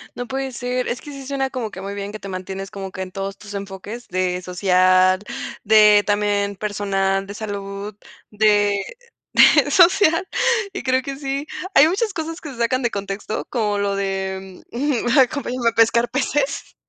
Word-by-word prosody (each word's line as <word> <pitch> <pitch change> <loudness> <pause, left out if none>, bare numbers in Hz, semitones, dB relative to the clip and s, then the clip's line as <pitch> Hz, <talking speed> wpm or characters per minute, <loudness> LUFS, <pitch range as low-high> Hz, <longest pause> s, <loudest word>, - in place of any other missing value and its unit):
No 245 - -5
puede 265 0 -3
ser. 250 +1 -2
Es 240 - -3
que 290 - -10
sí 275 -1 -9
suena, 270 -1 -1
como 235 -5 -4
que 190 - -8
muy 200 +1 -5
bien, 200 0 -5
que 215 - -6
te 195 - -8
mantienes 190 +1 -6
como 195 -1 -6
que 190 - -6
en 185 -1 -6
todos 195 +1 -5
tus 205 -1 -11
enfoques, 200 +4 -7
de 180 0 -1
social, 185 0 +3 0.5
de 210 -1 +6
también 205 -1 +1
personal, 195 -1 -1
de 200 - -7
salud, 200 -1 -6 0.4
de 205 -1 +3 0.5
de - - +6
social, 355 -1 +5 0.5
y - - -6
creo 260 0 +2
que 275 +1 -6
sí. 275 0 -3 0.3
Hay 290 +3 +7
muchas 410 +3 -1
cosas 325 0 -4
que 295 -4 -8
sacan 240 +3 0
de 240 - +1
contexto, 200 +1 -4
como 210 -4 0
lo 200 -1 -1
de, 190 -1 -4
mm, 235 - -5 0.3
mm, 295 - +5
acompáñenme 255 -2 +1
a - - -7
pescar 230 +1 +3
peces. 275 +2 -1
210 Hz, 180 wpm, -21 LUFS, 195-255 Hz, 0.5 s, Hay